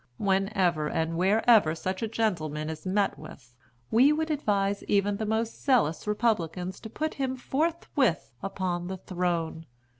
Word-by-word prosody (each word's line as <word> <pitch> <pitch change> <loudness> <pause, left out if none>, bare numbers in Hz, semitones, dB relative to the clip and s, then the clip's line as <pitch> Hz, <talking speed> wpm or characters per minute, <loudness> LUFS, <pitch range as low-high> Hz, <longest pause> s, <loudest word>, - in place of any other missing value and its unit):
Whenever 190 -5 +1
and 160 +1 -1
wherever 195 -1 +4
such 185 +3 -3
a 225 - 0
gentleman 160 -9 -1
is 160 +3 -8
met 200 +1 +1
with, 120 -2 -12 0.4
we 255 +6 +6
would 315 +1 0
advise 200 -8 0
even 200 0 +1
the 220 0 -3
most 220 +1 -2
zealous 225 - +2
Republicans 190 -5 -1
to 220 - -9
put 310 +7 -3
him 265 -2 -2
forthwith 275 - 0
upon 180 -3 -3
the 190 0 -4
throne. 170 -3 -2
195 Hz, 145 wpm, -28 LUFS, 175-225 Hz, 0.4 s, we